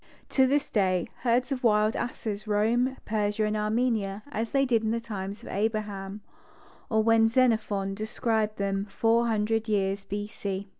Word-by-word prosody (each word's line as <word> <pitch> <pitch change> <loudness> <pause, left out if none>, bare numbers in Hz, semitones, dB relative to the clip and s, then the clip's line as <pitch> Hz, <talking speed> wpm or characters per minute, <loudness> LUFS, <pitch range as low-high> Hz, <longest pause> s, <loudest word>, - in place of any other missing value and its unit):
To 265 -1 +4
this 285 +2 +1
day, 185 -4 +1
herds 250 +2 +1
of 260 -2 -2
wild 215 -1 +3
asses 215 -3 -4
roam 235 +5 +1
Persia 210 0 0
and 210 0 -1
Armenia 215 -2 0
as 225 -2 -2
they 275 +2 +2
did 235 -4 +2
in 220 - -1
the 230 +1 0
times 205 -1 -6
of - - -9
Abraham, 205 -1 -2 0.7
or 220 -1 +2
when 225 0 +5
Xenophon 220 -5 +1
described 215 +1 -1
them 195 0 -1
four 225 +3 +2
hundred 225 0 0
years 195 -1 0
B. 205 +1 -4
C. 200 -2 -5
215 Hz, 160 wpm, -27 LUFS, 205-230 Hz, 0.7 s, when